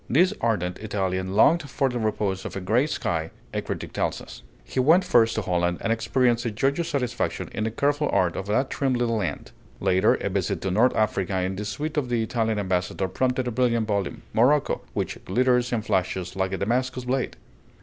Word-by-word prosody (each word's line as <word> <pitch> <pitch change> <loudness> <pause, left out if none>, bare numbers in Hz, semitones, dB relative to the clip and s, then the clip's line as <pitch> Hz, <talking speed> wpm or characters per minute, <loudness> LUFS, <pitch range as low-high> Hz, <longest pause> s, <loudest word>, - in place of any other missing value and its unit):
This 180 - +4
ardent 90 -6 0
Italian 95 -3 -2
longed 145 +7 +4
for 135 +2 +1
the 125 -2 -2
repose 105 -3 -1
of - - -6
"a - - -2
gray 110 +10 +2
sky," 80 - -2 0.2
a - - -1
critic - - -5
tells - - -1
us. - - -11 0.2
He - - -4
went 160 +8 +5
first 115 -9 +4
to 110 - -1
Holland, 90 -1 0
and 115 - +1
experienced 120 +1 +1
a 120 - -1
joyous 140 +10 0
satisfaction 125 -6 -2
in 110 - -2
the - - 0
careful 145 +5 0
art 90 -2 +2
of 95 - -4
that 130 +6 +1
trim 135 -2 0
little 120 -2 0
land. 90 -9 -3 0.3
Later, 95 0 +3
a - - -3
visit 95 -2 -1
to 95 - -1
North 115 +7 +3
Africa 95 -3 0
in 95 +1 -2
the 105 +2 -4
suite 150 +8 -4
of 135 -4 0
the 120 -2 +1
Italian 110 -1 0
ambassador 95 -1 -1
prompted 130 +3 0
a - - -1
brilliant 115 -2 +1
volume, 100 -2 -2
"Morocco," 135 +6 +3
"which - - -2
glitters 125 +4 +2
and 115 -3 -1
flashes 90 0 -1
like 95 0 -1
a 95 - -2
Damascus 125 +5 -1
blade." 130 +1 -1
115 Hz, 200 wpm, -25 LUFS, 95-130 Hz, 0.3 s, went